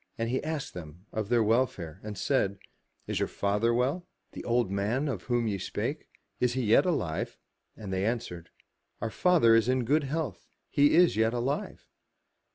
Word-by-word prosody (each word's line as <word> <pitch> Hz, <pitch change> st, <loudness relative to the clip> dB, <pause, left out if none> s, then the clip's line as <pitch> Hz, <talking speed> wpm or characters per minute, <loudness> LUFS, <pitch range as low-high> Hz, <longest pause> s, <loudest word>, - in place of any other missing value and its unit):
And 115 Hz, 0 st, -1 dB
he 130 Hz, -, -1 dB
asked 155 Hz, -2 st, -3 dB
them 85 Hz, +1 st, -10 dB
of 110 Hz, -2 st, -3 dB
their 120 Hz, -2 st, +4 dB
welfare, 105 Hz, -8 st, 0 dB
and 105 Hz, -2 st, -6 dB
said, 100 Hz, -5 st, +1 dB, 0.2 s
" -, -, -44 dB
Is -, -, -1 dB
your -, -, +1 dB
father 105 Hz, +3 st, 0 dB
well, 135 Hz, +9 st, 0 dB, 0.2 s
the -, -, -8 dB
old 120 Hz, -4 st, +1 dB
man 110 Hz, +9 st, 0 dB
of 120 Hz, -10 st, -3 dB
whom 120 Hz, -2 st, +1 dB
ye 100 Hz, -2 st, -1 dB
spake? -, -, -3 dB, 0.3 s
Is 125 Hz, -1 st, +2 dB
he 130 Hz, 0 st, -1 dB
yet 115 Hz, -, +4 dB
alive? 90 Hz, -, -1 dB, 0.2 s
*' -, -, -44 dB
And 100 Hz, -3 st, -6 dB
they 95 Hz, 0 st, 0 dB
answered, 105 Hz, -7 st, -3 dB, 0.3 s
*' -, -, -49 dB
Our 115 Hz, 0 st, -3 dB
father 165 Hz, -10 st, +4 dB
is 115 Hz, +1 st, +4 dB
in 130 Hz, -1 st, +1 dB
good 145 Hz, +4 st, +2 dB
health, 135 Hz, -, -3 dB, 0.2 s
he 145 Hz, +2 st, +4 dB
is 175 Hz, 0 st, +5 dB
yet 110 Hz, +2 st, +2 dB
alive." 130 Hz, +4 st, -3 dB
115 Hz, 190 wpm, -29 LUFS, 100-130 Hz, 0.3 s, is